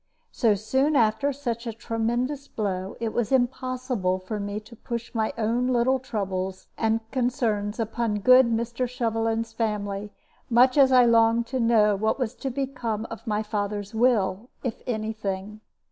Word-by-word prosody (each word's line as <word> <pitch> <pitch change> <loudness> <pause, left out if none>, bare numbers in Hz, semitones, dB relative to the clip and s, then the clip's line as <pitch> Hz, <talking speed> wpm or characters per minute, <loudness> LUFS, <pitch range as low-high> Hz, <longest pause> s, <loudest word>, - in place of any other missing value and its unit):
So 225 -4 +2
soon 265 +8 +1
after 225 +3 +3
such 240 -4 -4
a 230 - -3
tremendous 240 +5 -2
blow, 190 -4 -3
it 230 -1 -2
was 240 0 -1
impossible 255 -6 0
for 190 +3 -5
me 205 +1 -3
to 225 +2 -14
push 235 +1 -6
my 220 -2 0
own 230 +3 +1
little 255 +1 +2
troubles 190 -7 -3
and 225 0 +1
concerns 235 -5 -1
upon 225 -1 -1
good 255 +2 +7
Mr. 235 +2 -1
Shovelin's 225 -1 -1
family, 210 -2 -2 0.4
much 250 +2 +5
as 275 -2 +6
I 250 -1 +7
longed 230 0 +4
to 260 - +1
know 220 -3 +4
what 220 +3 0
was 250 -5 -2
to 270 - -3
become 250 -5 -3
of 225 +2 -8
my 210 0 0
father's 205 0 -3
will, 220 -2 +1
if 245 -4 -4
any 220 -2 -2
thing. 205 0 -5
225 Hz, 160 wpm, -25 LUFS, 210-250 Hz, 0.4 s, good